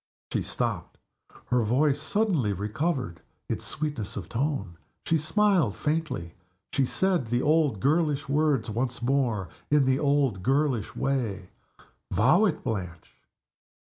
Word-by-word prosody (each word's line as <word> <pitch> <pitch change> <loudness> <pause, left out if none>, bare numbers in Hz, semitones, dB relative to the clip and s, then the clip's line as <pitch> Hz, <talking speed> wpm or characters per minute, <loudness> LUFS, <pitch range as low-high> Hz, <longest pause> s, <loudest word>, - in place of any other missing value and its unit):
She - - +1
stopped - - -3 0.5
her 125 -1 +4
voice 135 +6 +2
suddenly 160 - +1
recovered 105 - -2 0.3
its - - -3
sweetness 140 -9 -3
of - - -6
tone 115 - -2 0.3
she 165 - +2
smiled 160 - +2
faintly 150 - -2 0.4
she 135 -2 +2
said 185 -7 +1
the 120 +2 0
old 150 -8 +2
girlish 145 - +1
words 145 -5 +1
once 120 +2 -2
more, 120 - +1 0.2
in 145 -2 +4
the 130 +1 +2
old 140 -9 +1
girlish 135 -2 0
way, 115 -9 -2 0.6
"Vow 135 - +4
it, 205 - -1
Blanche!" 90 -6 -5
135 Hz, 125 wpm, -27 LUFS, 110-155 Hz, 0.6 s, her